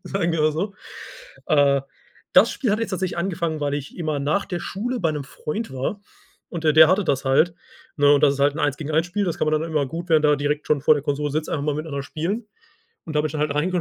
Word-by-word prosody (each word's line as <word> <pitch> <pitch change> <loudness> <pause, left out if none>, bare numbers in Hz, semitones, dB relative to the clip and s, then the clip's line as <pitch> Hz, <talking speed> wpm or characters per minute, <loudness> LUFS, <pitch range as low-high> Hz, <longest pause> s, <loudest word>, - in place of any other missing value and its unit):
sagen 175 -3 -1
wir 165 - 0
mal 155 - +3
so. 195 +6 -3 0.7
Äh, 140 -2 +3 0.5
das - - +6
Spiel 245 -8 -1
hat 215 - 0
jetzt 230 - -2
tatsächlich 185 -2 -2
angefangen, 170 -3 -2
weil 145 -1 -1
ich 145 -1 -6
immer 155 -3 -1
nach 155 +8 0
der 175 -2 -4
Schule 245 +6 -3
bei 165 -4 +1
'nem 150 -2 -4
Freund 150 - -5
war. 135 +10 -3 0.5
Und 170 -3 -6
der 155 - +4
der 160 0 +8
hatte 190 +3 +2
das 140 -5 0
halt, 140 +6 +3 0.4
ne? 145 -1 +5
Und 145 - +1
das 140 -1 +5
ist 140 - -6
halt 140 +1 +3
'n - - -6
1 145 -2 +1
gegen 155 -1 -5
1 160 +3 +2
Spiel. 200 +3 -1
Das 175 -4 -2
kann - - 0
man 155 0 +1
dann 165 +1 -4
immer 150 -3 0
gut 170 +6 -6
während 155 -2 +4
man 150 - +5
da - - +2
direkt 145 +1 -2
schon 150 -2 +2
vor 155 - +6
der 145 - -3
Konsole 145 0 -1
sitzt, 155 +1 -2
einfach 145 - -2
mal 150 -1 0
miteinander 150 -2 -4
spielen. 195 +11 -3 0.6
Und 155 - -6
da 150 - +4
bin 155 - 0
ich - - -9
dann 155 - -3
halt 150 - 0
reingekommen 175 +5 0
155 Hz, 275 wpm, -23 LUFS, 145-175 Hz, 0.7 s, der